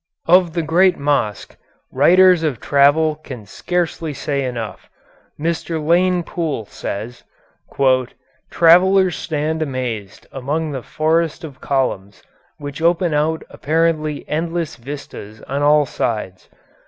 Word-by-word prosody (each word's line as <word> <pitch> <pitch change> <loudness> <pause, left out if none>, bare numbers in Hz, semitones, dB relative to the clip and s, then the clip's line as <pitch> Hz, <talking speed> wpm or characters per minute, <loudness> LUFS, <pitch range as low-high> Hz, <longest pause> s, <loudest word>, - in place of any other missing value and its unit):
Of 175 -1 +4
the 170 -1 -1
great 175 +3 +3
mosque 140 -8 -1 0.4
writers 180 +5 +5
of 150 -8 -1
travel 145 +2 +3
can 130 -8 -10
scarcely 165 - -3
say 140 -1 -2
enough. 115 -6 -6 0.5
Mr. 165 +1 -2
Lane 175 +3 +2
Poole 160 -9 -3
says: 110 +4 -6 1.3
"Travellers 180 +2 +5
stand 160 0 -2
amazed 125 -8 -4
among 150 +4 -3
the 135 -2 -4
forest 160 +4 -1
of 145 -5 -10
columns 105 -8 -2 0.3
which 145 0 -7
open 170 0 +2
out 155 +2 0
apparently 155 -1 -1
endless 165 +1 -2
vistas 115 -5 -9
on 140 +2 -3
all 150 0 +4
sides. 105 -7 -4
150 Hz, 115 wpm, -19 LUFS, 135-165 Hz, 1.3 s, writers